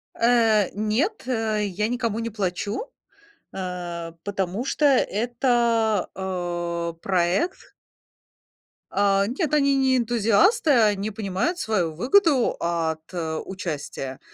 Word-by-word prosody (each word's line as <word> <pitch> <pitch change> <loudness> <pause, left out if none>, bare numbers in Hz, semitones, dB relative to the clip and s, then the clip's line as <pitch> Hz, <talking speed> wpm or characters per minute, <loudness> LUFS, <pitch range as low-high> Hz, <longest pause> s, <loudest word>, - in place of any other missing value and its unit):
Э, 225 -4 +3
нет, 220 - -1
э, 220 -4 0
я 205 +2 -1
никому 230 -2 -2
не 230 0 -3
плачу, 205 - -3 0.6
а 175 -3 -5
потому 200 +3 -2
что 295 +2 0
это, 235 -4 +2
а, 175 -2 -3
проект 190 - 0 1.2
А, 200 -1 +2
нет, 290 - -2
они 280 -2 +3
не 265 -1 +3
энтузиасты, 240 - +3
они 215 -4 +3
понимают 215 - -2
свою 180 -8 0
выгоду 270 - +3
от, 165 -2 -1
э, 160 -3 -3
участия, 150 -7 -5
210 Hz, 105 wpm, -24 LUFS, 180-245 Hz, 1.2 s, Э